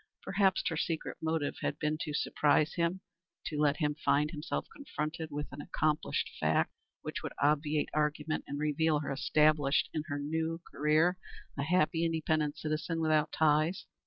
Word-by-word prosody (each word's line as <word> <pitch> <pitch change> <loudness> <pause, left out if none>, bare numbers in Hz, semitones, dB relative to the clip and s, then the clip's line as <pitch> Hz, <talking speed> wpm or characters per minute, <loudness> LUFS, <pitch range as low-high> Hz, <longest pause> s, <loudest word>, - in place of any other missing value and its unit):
Perhaps 195 -1 +2
her 160 - -3
secret 160 0 -2
motive 160 -2 -1
had 145 - -1
been 150 0 0
to 150 - -3
surprise 150 +1 +2
him, 170 +2 0 0.4
to 150 - -3
let 150 -1 +3
him 150 -3 +1
find 150 +2 +3
himself 150 -2 -3
confronted 160 - -4
with 145 0 -3
an 140 +1 -7
accomplished 150 +1 0
fact, - - +2 0.3
which - - -4
would - - -5
obviate 150 +1 +2
argument 150 +1 0
and 140 - -4
reveal 150 +1 +1
her 145 - -3
established 150 +1 +3
in 155 - -1
her 145 -3 -2
new 160 +3 -2
career, 155 +5 +2 0.4
a 140 - -2
happy, 165 +1 +2
independent 155 -2 0
citizen, 155 +2 -2
without 155 -1 +2
ties. 155 +3 +2
155 Hz, 160 wpm, -32 LUFS, 150-160 Hz, 0.4 s, let